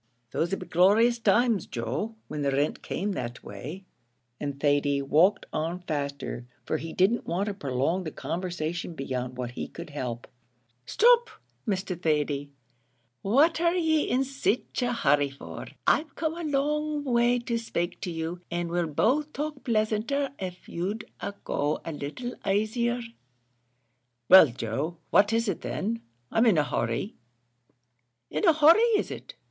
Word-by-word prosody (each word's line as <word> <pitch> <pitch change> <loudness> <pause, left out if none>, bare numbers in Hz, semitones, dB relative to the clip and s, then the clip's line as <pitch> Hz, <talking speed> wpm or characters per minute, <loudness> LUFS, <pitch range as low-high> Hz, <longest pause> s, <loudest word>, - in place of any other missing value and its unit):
"Those 170 - 0
'd 195 - -1
be 180 - -7
glorious 215 +8 +4
times, 225 -1 +3
Joe, 135 - -3
when 150 -1 -4
the 140 - +1
rint 140 +2 0
came 205 +3 -2
that 120 -9 -5
way," 150 - -8 0.5
and 140 -1 -4
Thady 145 -1 +2
walked 160 +9 +3
on 165 +4 -2
faster, 140 -5 -4 0.2
for 155 - 0
he 160 +1 -6
didn't 200 +6 +2
want 180 +4 0
to 205 - -2
prolong 145 +2 -1
the 160 - -3
conversation 170 +2 -4
beyond 125 -3 -4
what 125 -1 -3
he - - -5
could 170 -3 -9
help. 125 -4 -4 0.6
"Stop, 475 +1 +5 0.4
Mr. 190 -3 -2
Thady; 145 -3 0 0.7
what 290 +11 +3
are 340 +1 +3
ye 320 -3 +2
in 255 +2 +2
sich 270 -2 -1
a 245 0 +1
hurry 145 - +2
for? 135 - -9 0.2
I've 305 -2 +2
come 320 -1 -1
a 335 -3 -3
long 300 +1 0
way 240 -2 +3
to 240 -1 -2
spake 175 -6 -3
to - - -3
you 165 +1 -4
and 175 0 -2
we'll 175 -1 0
both 270 - +1
talk 295 -1 -4
pleasanter 230 +5 0
av' 180 -1 -6
you'd 200 +6 -3 0.4
go 145 +1 0
a 165 - -3
little 155 - -5
aisier." 220 +5 +1 1.3
"Well, 185 -3 +10
Joe, 130 +7 -3
what 205 +1 +5
is 230 0 +1
it 195 - -2
then? 225 +4 -2 0.3
I'm 225 +2 +4
in 205 -7 +5
a 150 - +4
hurry." 200 +8 -2 1.2
"In - - 0
a 335 - +7
hurry 310 +5 +7 0.2
is - - -2
it? - - -8
185 Hz, 155 wpm, -27 LUFS, 150-240 Hz, 1.3 s, Well